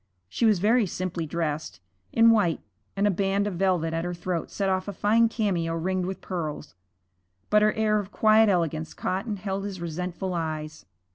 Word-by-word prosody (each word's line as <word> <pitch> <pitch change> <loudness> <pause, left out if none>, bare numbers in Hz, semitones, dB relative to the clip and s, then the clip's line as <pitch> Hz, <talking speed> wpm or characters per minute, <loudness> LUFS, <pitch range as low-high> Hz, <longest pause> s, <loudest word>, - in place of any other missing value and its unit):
She 225 - +1
was 215 -3 +4
very 215 +4 +3
simply 175 -2 -3
dressed, 150 - -3 0.3
in 230 0 +6
white, 200 -8 +2 0.4
and 200 +1 +1
a 205 - +4
band 195 +2 0
of 205 - -2
velvet 175 -3 +1
at 165 0 -1
her 175 0 -3
throat 175 -1 -3
set 195 - -2
off 185 0 0
a 205 - -4
fine 225 +4 +3
cameo 180 -8 -1
ringed 180 +2 -1
with 190 - -5
pearls, 155 -5 -5 0.8
but 210 0 +5
her 215 0 +4
air 215 -1 +2
of 200 -1 -6
quiet 220 0 +5
elegance 165 -4 -1
caught 190 +5 -2
and 210 -2 -2
held 195 0 -3
his 200 -2 -5
resentful 180 +2 -4
eyes. 155 - -4
185 Hz, 190 wpm, -26 LUFS, 165-205 Hz, 0.8 s, in